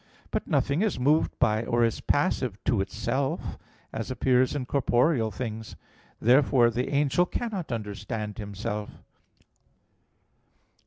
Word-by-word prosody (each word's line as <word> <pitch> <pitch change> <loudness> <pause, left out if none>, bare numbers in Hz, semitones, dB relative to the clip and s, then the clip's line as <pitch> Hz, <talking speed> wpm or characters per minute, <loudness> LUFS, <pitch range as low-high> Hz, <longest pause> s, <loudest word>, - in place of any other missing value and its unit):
But - - -2
nothing 140 +5 +1
is 215 -9 0
moved 150 +5 +2
by 110 -2 +2
or 120 +1 +1
is 115 -1 0
passive - - 0
to - - +2
itself; 120 +7 -2 0.3
as 110 +2 -4
appears 130 0 +2
in 135 -3 -2
corporeal 125 -2 +2
things. 110 0 -6 0.4
Therefore 125 -1 +4
the 125 +3 -2
angel 145 +5 +2
cannot 200 - -4
understand 105 -1 -4
himself. 105 0 -5
120 Hz, 115 wpm, -27 LUFS, 110-140 Hz, 0.4 s, Therefore